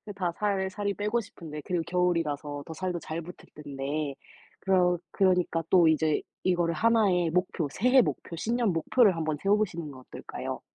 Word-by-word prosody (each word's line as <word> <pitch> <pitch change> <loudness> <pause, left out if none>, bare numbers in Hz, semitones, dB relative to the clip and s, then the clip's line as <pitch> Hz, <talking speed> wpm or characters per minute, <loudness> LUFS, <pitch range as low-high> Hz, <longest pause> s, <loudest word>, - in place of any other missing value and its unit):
다 180 -3 -1
살 195 -2 0
살이 200 +1 -2
빼고 210 +4 -1
싶은데 155 -7 -9
그리고 175 -2 -1
겨울이라서 155 -5 -1
더 160 - -7
살도 180 0 -3
잘 160 +1 -5
붙을 175 +2 -10 0.2
텐데 145 0 -4 0.4
그러 180 -2 +3
그러니까 180 -4 +2
또 175 -3 +6
이제 155 -1 +2 0.2
이거를 175 -2 +1
1 225 +2 +3
의 175 -2 +2
목표, 180 -2 0
새해 250 - +4
목표, 170 - -3
신년 230 +4 0
목표를 195 +5 +3
한번 155 -2 -2
세워보시는 195 -6 0
건 130 -2 -12
어떨까요? - - -7
180 Hz, 340 characters per minute, -28 LUFS, 160-195 Hz, 0.4 s, 또